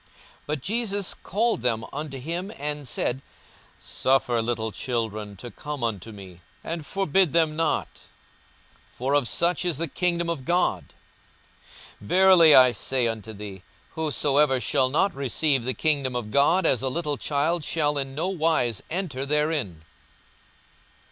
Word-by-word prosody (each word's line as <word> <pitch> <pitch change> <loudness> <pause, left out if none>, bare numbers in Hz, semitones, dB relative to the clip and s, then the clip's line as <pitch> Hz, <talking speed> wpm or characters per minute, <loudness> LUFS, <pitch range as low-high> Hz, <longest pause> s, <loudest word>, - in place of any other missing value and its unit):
42:018:016 - - -32 0.4
But 150 -2 -3
Jesus 205 - 0
called 225 - -1
them 115 -2 0
unto 145 -1 -5
him, 170 +9 -4
and 145 -1 -3
said, 125 +2 -1 0.6
Suffer 130 -3 +1
little 110 -1 -2
children 110 -1 -3
to 120 +6 -9
come 150 -4 -6
unto 110 -2 -3
me, 95 -4 -12 0.2
and 165 -1 -4
forbid 195 -4 +1
them 160 -2 +2
not: 160 -1 0 1.0
for 130 +3 -3
of 145 -4 +2
such 170 +4 +1
is 175 -5 0
the 165 +2 -2
kingdom 170 +1 0
of 165 -6 -3
God. 175 +6 0 1.1
42:018:017 - - -11
Verily 185 - +6
I 130 -1 +8
say 125 +2 0
unto 110 -1 -5
you, 100 -2 -9 0.3
Whosoever 145 -3 +1
shall 130 0 +1
not 170 +7 +1
receive 140 -1 0
the 130 - -2
kingdom 140 -5 0
of 115 -3 -4
God 165 - +3
as 130 - +3
a 130 - -1
little 150 0 -2
child 155 +5 0
shall 150 -2 0
in 135 -1 -4
no 160 +5 -1
wise 160 - 0
enter 165 -7 -3
therein. 145 - -1
145 Hz, 150 wpm, -25 LUFS, 120-165 Hz, 1.1 s, I